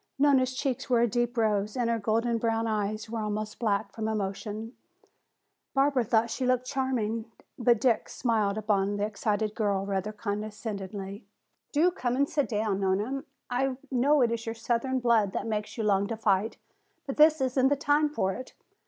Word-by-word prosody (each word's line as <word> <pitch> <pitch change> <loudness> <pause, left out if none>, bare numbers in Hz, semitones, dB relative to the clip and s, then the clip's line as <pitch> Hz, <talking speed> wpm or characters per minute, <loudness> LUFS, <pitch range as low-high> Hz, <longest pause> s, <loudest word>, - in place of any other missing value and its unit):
Nona's 265 -2 +3
cheeks 260 -2 -2
were 240 -2 +4
a 240 - +4
deep 240 +2 -1
rose 210 0 +1
and 240 -2 +1
her 230 -1 +1
golden 230 +2 +1
brown 225 0 0
eyes 215 -1 -2
were 225 +1 -4
almost 215 0 -3
black 205 -3 0
from 220 +1 -4
emotion. 215 +2 -3 1.0
Barbara 270 -2 +3
thought 225 +1 +2
she 260 - -3
looked 255 0 +2
charming. 250 -5 -1 0.3
But 235 -2 +4
Dick 235 -1 +2
smiled 215 -4 0
upon 205 -1 +1
the 205 - 0
excited 210 0 -1
girl 200 -3 0
rather 195 +1 -2
condescendingly. 205 -1 -5 0.5
"Do 325 +5 +3
come 245 -8 -2
and 280 +2 +2
sit 285 -6 0
down, 210 -2 0
please, - - -4
Nona. 210 +8 0 0.3
I 255 +1 0
know 275 +3 +3
it 235 - +2
is 230 -1 -3
your 225 - -2
southern 240 +3 -1
blood 225 -5 +3
that - - -2
makes 215 0 -3
you 225 - -1
long 200 -1 +2
to 225 - -4
fight. 210 0 +1 0.5
But 270 - -5
this 310 0 +6
isn't 260 0 +2
the 285 - +3
time 295 +2 +2
for 195 -10 0
it. 255 - -9
225 Hz, 180 wpm, -28 LUFS, 210-255 Hz, 1.0 s, this